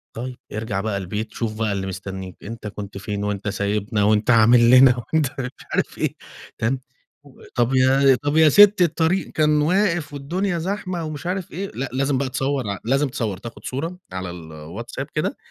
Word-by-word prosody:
طيب 125 Hz, +2 st, -5 dB, 0.2 s
ارجع 105 Hz, -2 st, -2 dB
بقى 110 Hz, -2 st, -2 dB
البيت 105 Hz, +4 st, -4 dB
شوف 110 Hz, -2 st, -3 dB
بقى 110 Hz, -2 st, +1 dB
اللي 95 Hz, -1 st, -3 dB
مستنيك، 95 Hz, -1 st, -6 dB
أنت 110 Hz, 0 st, -7 dB
كنت 100 Hz, -1 st, -7 dB
فين 100 Hz, +1 st, -4 dB
وأنت 105 Hz, 0 st, -2 dB
سايبنا 105 Hz, +1 st, -1 dB
وأنت 105 Hz, +1 st, +2 dB
عامل 115 Hz, +1 st, +6 dB
لنا 130 Hz, -1 st, +7 dB
وأنت 150 Hz, +5 st, 0 dB
مش 125 Hz, 0 st, -6 dB
عارف -, -, -1 dB
إيه -, -, -1 dB, 0.4 s
تمام، 125 Hz, +4 st, 0 dB, 0.4 s
و 140 Hz, -2 st, -18 dB
طَب 120 Hz, +1 st, +2 dB
يا 130 Hz, 0 st, +5 dB
طَب 145 Hz, +2 st, +1 dB
يا 160 Hz, -1 st, +7 dB
سِتّي 205 Hz, +3 st, +7 dB
الطريق 165 Hz, +1 st, +1 dB
كان 150 Hz, -1 st, +3 dB
واقف 175 Hz, -2 st, +1 dB
والدنيا 175 Hz, +7 st, -2 dB
زحمة 185 Hz, -1 st, -3 dB
ومش 155 Hz, +1 st, -5 dB
عارف 185 Hz, 0 st, -3 dB
إيه 195 Hz, +4 st, -5 dB
لأ 135 Hz, +1 st, -3 dB
لازم 135 Hz, +1 st, +1 dB
بقى 135 Hz, -1 st, -1 dB
تصوّر 135 Hz, -2 st, -1 dB
ع 100 Hz, -, -2 dB
لازم 135 Hz, +4 st, +2 dB
تصوّر 115 Hz, -8 st, -3 dB
تاخد 115 Hz, +4 st, -10 dB
صورة 165 Hz, +7 st, -4 dB
على 95 Hz, 0 st, -4 dB
الWhatsApp 85 Hz, -, -7 dB
كده 155 Hz, -, -1 dB
125 Hz, 180 wpm, -22 LUFS, 105-150 Hz, 0.4 s, لنا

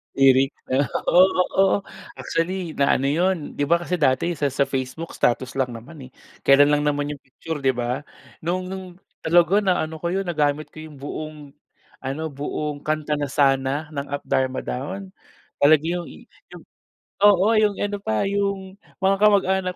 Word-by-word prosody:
Lyric 135 Hz, 0 st, +5 dB, 0.2 s
'no 135 Hz, 0 st, +2 dB, 0.2 s
oo, 185 Hz, +2 st, +7 dB, 0.3 s
oo 195 Hz, 0 st, +5 dB, 0.4 s
actually 175 Hz, 0 st, -2 dB
na 140 Hz, -, +4 dB
ano 135 Hz, -, -1 dB
'yun 175 Hz, +5 st, +2 dB, 0.2 s
'di 145 Hz, -, -2 dB
ba 170 Hz, -, +5 dB
kasi 180 Hz, -1 st, -2 dB
dati 145 Hz, +4 st, +2 dB
sa 145 Hz, -2 st, -1 dB
sa 140 Hz, +1 st, +1 dB
Facebook 135 Hz, +5 st, -4 dB
status 125 Hz, +1 st, 0 dB
lang 125 Hz, -2 st, -1 dB
naman 130 Hz, +3 st, -11 dB
eh -, -, -21 dB, 0.3 s
kelan 145 Hz, +1 st, +5 dB
lang 145 Hz, 0 st, +2 dB
naman 145 Hz, 0 st, 0 dB
'yung 145 Hz, -, -7 dB
picture 150 Hz, +3 st, -7 dB
'di 135 Hz, -2 st, +1 dB
ba? 120 Hz, +1 st, -2 dB, 0.4 s
Nung 180 Hz, +3 st, -3 dB
nung 185 Hz, -2 st, -7 dB, 0.3 s
talaga 175 Hz, +4 st, +4 dB
na 185 Hz, -5 st, +1 dB
ano 160 Hz, 0 st, -6 dB
ko 170 Hz, -, -3 dB
'yun 195 Hz, +2 st, -1 dB
nagamit 150 Hz, -3 st, -1 dB
ko 155 Hz, -, -12 dB
yung 155 Hz, -2 st, -10 dB
buong 155 Hz, +2 st, -6 dB, 0.6 s
ano 145 Hz, +4 st, -4 dB
buong 145 Hz, +1 st, -4 dB
kanta 150 Hz, 0 st, -2 dB
na 145 Hz, -, -1 dB
"Sana" 135 Hz, +2 st, +1 dB
ng 140 Hz, -1 st, -4 dB
Up 145 Hz, -, -3 dB
Dharma 130 Hz, 0 st, -1 dB
Down. 185 Hz, +9 st, -5 dB, 0.5 s
Talaga 150 Hz, +1 st, +5 dB
yung 175 Hz, +1 st, -2 dB, 0.4 s
'yung -, -, -11 dB, 0.6 s
oo 200 Hz, -1 st, +6 dB
'yung 215 Hz, -2 st, +2 dB
ano 205 Hz, 0 st, -2 dB
pa 110 Hz, -, 0 dB
yung 200 Hz, -1 st, -2 dB, 0.3 s
mga 195 Hz, +1 st, +3 dB
kamag-anak 190 Hz, -3 st, +3 dB
155 Hz, 170 wpm, -23 LUFS, 140-185 Hz, 0.6 s, oo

